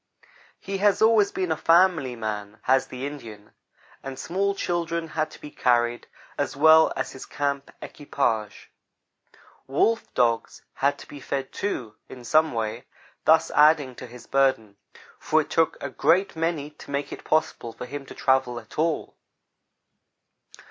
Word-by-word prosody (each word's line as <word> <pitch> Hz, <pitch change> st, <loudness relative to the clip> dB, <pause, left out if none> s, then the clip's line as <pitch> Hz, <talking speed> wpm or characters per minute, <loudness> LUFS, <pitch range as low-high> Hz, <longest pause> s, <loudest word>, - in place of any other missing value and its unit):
He 195 Hz, 0 st, -5 dB
has 200 Hz, -1 st, +3 dB
always 220 Hz, -2 st, +4 dB
been 185 Hz, -3 st, -2 dB
a -, -, +2 dB
family 165 Hz, -7 st, +3 dB
man, 105 Hz, -2 st, -5 dB
has 130 Hz, 0 st, +2 dB
the 130 Hz, +1 st, -6 dB
Indian, 115 Hz, -8 st, -9 dB, 0.5 s
and 135 Hz, -1 st, -7 dB
small 195 Hz, +3 st, -1 dB
children 170 Hz, -3 st, -2 dB
had 155 Hz, 0 st, -1 dB
to -, -, -14 dB
be 150 Hz, -, -10 dB
carried, 120 Hz, -1 st, +1 dB, 0.3 s
as 145 Hz, -1 st, -1 dB
well 160 Hz, +2 st, +6 dB
as -, -, -3 dB
his 130 Hz, -, -10 dB
camp 140 Hz, -1 st, -2 dB
equipage. 110 Hz, -8 st, -3 dB, 1.0 s
Wolf 225 Hz, +12 st, +1 dB
dogs 115 Hz, -2 st, 0 dB
had 140 Hz, +1 st, 0 dB
to -, -, -12 dB
be 145 Hz, -, -10 dB
fed, 135 Hz, 0 st, -4 dB
too, 120 Hz, -, -4 dB
in 125 Hz, -, -10 dB
some 155 Hz, +5 st, +3 dB
way, 115 Hz, +2 st, -3 dB, 0.4 s
thus 160 Hz, +1 st, +4 dB
adding 150 Hz, -3 st, +4 dB
to 125 Hz, -, -10 dB
his 120 Hz, 0 st, -13 dB
burden; 130 Hz, -7 st, +1 dB, 0.4 s
for -, -, +2 dB
it -, -, -10 dB
took -, -, +2 dB
a -, -, -4 dB
great 185 Hz, +3 st, +2 dB
many 160 Hz, -3 st, -2 dB
to 150 Hz, -, -15 dB
make 140 Hz, 0 st, -3 dB
it -, -, -9 dB
possible 155 Hz, -6 st, 0 dB
for 125 Hz, -, -8 dB
him 140 Hz, +3 st, -7 dB
to -, -, -10 dB
travel 130 Hz, -2 st, +1 dB
at 115 Hz, +5 st, -11 dB
all. 160 Hz, -1 st, 0 dB
140 Hz, 155 wpm, -25 LUFS, 125-160 Hz, 1.0 s, well